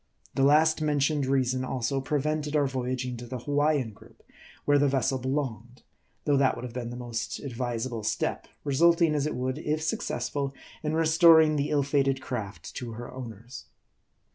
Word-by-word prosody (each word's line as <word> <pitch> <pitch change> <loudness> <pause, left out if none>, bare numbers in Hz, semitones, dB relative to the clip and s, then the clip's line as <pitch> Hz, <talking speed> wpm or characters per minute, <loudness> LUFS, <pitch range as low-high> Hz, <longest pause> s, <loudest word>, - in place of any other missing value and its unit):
The - - 0
last 155 +3 +4
mentioned 145 -1 +1
reason, 130 -1 +1
also, 130 +1 -1
prevented 150 +2 -1
our 145 -1 +3
voyaging 130 -1 -3
to 120 +1 -8
the 130 - -4
Hawaiian 145 -1 +1
group, - - -19 0.4
where 145 0 +4
the 145 - +4
vessel 135 -1 +1
belonged; 125 -3 -3 0.4
though 145 -2 +3
that 135 -1 +3
would - - -8
have 125 -2 -6
been 120 -1 -4
the 120 - -6
most 120 -2 -4
advisable 120 -2 -3
step, 105 - -2 0.2
resulting, 165 +3 +4
as 150 0 0
it 155 - -3
would, 130 +3 -2
if 155 0 -1
successful, 140 -2 -2 0.3
in 155 0 -2
restor 160 0 +6
ing 155 0 0
the 145 0 0
ill 145 -2 +2
fated 135 -1 +1
craft 110 -6 -6
to 120 -2 -5
her 120 +2 -8
owners. 120 0 -9
135 Hz, 170 wpm, -28 LUFS, 125-150 Hz, 0.4 s, restor